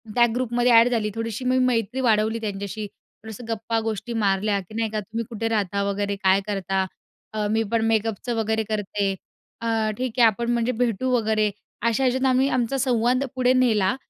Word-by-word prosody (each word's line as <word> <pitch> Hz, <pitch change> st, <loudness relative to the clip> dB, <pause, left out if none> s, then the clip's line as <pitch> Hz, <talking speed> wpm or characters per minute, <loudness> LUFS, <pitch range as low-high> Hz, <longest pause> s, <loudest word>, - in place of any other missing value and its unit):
त्या 240 Hz, -1 st, +6 dB
ग्रुपमध्ये 245 Hz, 0 st, +1 dB
ॲड 230 Hz, +1 st, +7 dB
झाली, 225 Hz, -3 st, 0 dB
थोडीशी 225 Hz, +2 st, -4 dB
मी 255 Hz, +1 st, +2 dB
मैत्री 240 Hz, +1 st, 0 dB
वाढवली 220 Hz, -1 st, +2 dB
त्यांच्याशी. 205 Hz, 0 st, -4 dB
थोडंसं 220 Hz, +2 st, -13 dB
गप्पा 225 Hz, +1 st, -1 dB
गोष्टी 220 Hz, +1 st, -4 dB
मारल्या 200 Hz, -1 st, +1 dB
की 190 Hz, +2 st, -12 dB
नाही 225 Hz, -1 st, 0 dB
का 215 Hz, -, -1 dB
तुम्ही 225 Hz, +3 st, -5 dB
कुठे 225 Hz, -1 st, -3 dB
राहता, 200 Hz, -2 st, 0 dB
वगैरे 200 Hz, 0 st, -1 dB
काय 190 Hz, +1 st, +4 dB
करता? 195 Hz, -1 st, -1 dB, 0.5 s
अ, 210 Hz, -1 st, -1 dB
मी 220 Hz, +1 st, +2 dB
पण 230 Hz, -1 st, +2 dB
मेकअपचं 225 Hz, +2 st, 0 dB
वगैरे 220 Hz, 0 st, 0 dB
करते. 205 Hz, -2 st, -1 dB, 0.5 s
अ, 225 Hz, -1 st, 0 dB
ठीक 255 Hz, -1 st, -3 dB
आहे 240 Hz, -, +8 dB
आपण 235 Hz, +2 st, -1 dB
म्हणजे 235 Hz, +1 st, +1 dB
भेटू 245 Hz, +2 st, 0 dB
वगैरे. 220 Hz, -3 st, +2 dB, 0.3 s
अशा 230 Hz, +3 st, +1 dB
ह्याच्यात 260 Hz, +1 st, +1 dB
आम्ही 260 Hz, +1 st, +3 dB
आमचा 245 Hz, +2 st, 0 dB
संवाद 250 Hz, 0 st, +2 dB
पुढे 255 Hz, 0 st, +3 dB
नेला 225 Hz, -7 st, +3 dB
225 Hz, 180 wpm, -24 LUFS, 210-240 Hz, 0.5 s, आहे